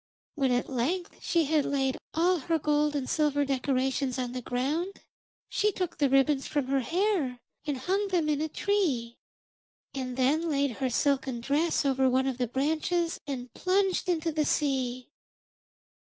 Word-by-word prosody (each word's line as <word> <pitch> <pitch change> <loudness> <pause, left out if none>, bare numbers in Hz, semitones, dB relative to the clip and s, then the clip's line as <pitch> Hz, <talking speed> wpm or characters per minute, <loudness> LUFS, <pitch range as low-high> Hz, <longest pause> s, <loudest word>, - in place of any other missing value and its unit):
When 270 -4 +1
at 245 0 +1
length 290 +8 -2
she 335 -2 +2
had 300 0 +2
laid 270 -2 0 0.2
all 350 +2 +3
her 325 +4 0
gold 300 0 +1
and 270 -3 -2
silver 290 -2 +1
decorations 265 -1 0
on 250 -2 -2
the 250 0 -4
ground, 290 +11 -2 0.5
she 420 0 +1
took 365 -4 -4
the 285 -2 +3
ribbons 270 +1 +3
from 290 -3 -1
her 275 0 +2
hair 330 - 0 0.3
and 290 -2 -1
hung 385 +10 0
them 350 -5 +1
in 300 -1 +1
a 315 - -1
tree, 295 - 0 0.7
and 255 -2 -4
then 300 +6 +2
laid 280 -2 +1
her 265 -2 0
silken 265 -1 0
dress 290 +6 +1
over 265 -1 +3
one 260 +1 +2
of 260 -2 -2
the 245 - +1
branches 320 +7 0
and 255 -3 -5
plunged 380 0 +1
into 330 -2 +1
the 305 0 +1
sea. 255 -4 -1
285 Hz, 165 wpm, -28 LUFS, 260-330 Hz, 0.7 s, all